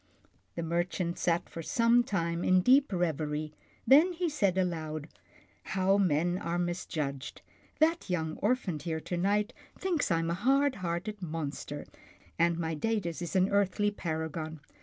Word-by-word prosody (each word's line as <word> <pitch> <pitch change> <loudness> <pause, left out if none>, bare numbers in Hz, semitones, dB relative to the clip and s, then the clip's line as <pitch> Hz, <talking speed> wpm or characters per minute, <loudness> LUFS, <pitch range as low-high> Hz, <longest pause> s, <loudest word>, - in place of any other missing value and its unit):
The 170 - -3
merchant 170 +1 -1
sat 170 -1 +1
for 165 - -7
some 235 - +3
time 170 -5 -1
in 185 0 +4
deep 270 +6 +5
reverie, 155 -4 -1 0.3
then 315 +7 +6
he 350 0 -1
said 200 - +1
aloud, 160 -4 -2 0.3
" - - -32
How 195 +2 +3
men 175 0 +2
are 170 +1 -2
misjudged. 155 -6 -3 0.3
That 325 - +2
young 160 -3 -1
orphan 205 -7 0
here 160 0 -3
to 175 - -4
night 205 +5 +1 0.2
thinks 355 - 0
I 165 - +3
am 165 0 -1
a - - +1
hard 270 +8 +2
hearted 185 +4 -3
monster, 150 -3 -5 0.5
and 170 0 +3
my 165 -1 -2
Datus 180 -1 -2
is 175 +1 -4
an 185 +1 +4
earthly 205 +1 +2
paragon. 160 -3 -4
175 Hz, 155 wpm, -30 LUFS, 165-210 Hz, 0.5 s, then